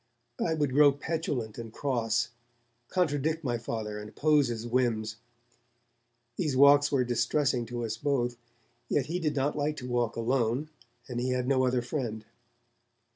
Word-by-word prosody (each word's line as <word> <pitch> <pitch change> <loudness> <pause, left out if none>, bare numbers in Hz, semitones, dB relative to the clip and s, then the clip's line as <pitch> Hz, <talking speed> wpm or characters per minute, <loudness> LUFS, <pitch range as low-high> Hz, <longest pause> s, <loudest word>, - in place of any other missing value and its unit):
I 160 - +1
would 145 -4 0
grow 145 +1 +7
petulant 140 -7 -3
and 115 -1 -7
cross, 120 -3 0 0.6
contradict 160 -2 0
my 120 -3 -1
Father, 110 -2 -4
and 105 0 -8
oppose 150 0 +3
his 115 -1 -4
whims. 115 -3 0 1.2
These 150 -7 0
walks 145 +1 +6
were 135 -3 +3
distressing 120 +1 +1
to 120 0 -3
us 110 0 -3
both, 125 -4 0 0.5
yet 140 - +1
he 170 +5 -2
did 155 -4 -1
not 140 +1 0
like 150 +1 -1
to 125 - -6
walk 120 -2 0
alone, 125 +4 0 0.4
and 120 -2 -3
he 125 +1 -1
had 125 0 -1
no 130 -1 +3
other 125 -1 +1
friend. 120 -5 -4
125 Hz, 155 wpm, -29 LUFS, 115-145 Hz, 1.2 s, grow